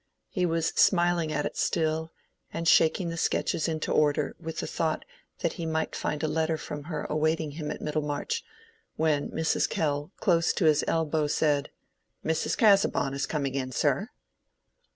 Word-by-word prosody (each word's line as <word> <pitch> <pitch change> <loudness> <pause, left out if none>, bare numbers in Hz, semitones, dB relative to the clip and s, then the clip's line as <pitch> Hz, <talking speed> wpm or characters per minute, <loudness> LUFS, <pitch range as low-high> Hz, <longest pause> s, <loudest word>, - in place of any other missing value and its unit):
He 180 -2 0
was 165 -1 +1
smiling 175 -3 +3
at 150 -1 -1
it - - -4
still, 160 0 0 0.4
and 165 0 -3
shaking 165 +2 +4
the 165 - -4
sketches 160 - 0
into 160 -1 -2
order 145 -1 +2
with 165 -1 -6
the - - -2
thought 160 -1 -1 0.4
that - - 0
he 170 - -5
might 160 0 -1
find 150 0 -2
a - - +2
letter 160 +1 0
from 145 -1 -7
her 155 -2 -4
awaiting 155 0 0
him 150 0 -5
at - - -5
Middlemarch, 150 - -2 0.5
when 155 -2 +1
Mrs. 160 0 0
Kell 145 -1 -1
close 170 -3 +2
to 175 - 0
his 155 -2 +4
elbow 160 -2 +1
said— 145 -1 +1 0.6
"Mrs. 160 0 0
Casaubon 195 -10 +4
is 140 - -2
coming 140 -4 -2
in, 130 -2 -2
sir." 145 - +1
155 Hz, 165 wpm, -28 LUFS, 150-165 Hz, 0.6 s, shaking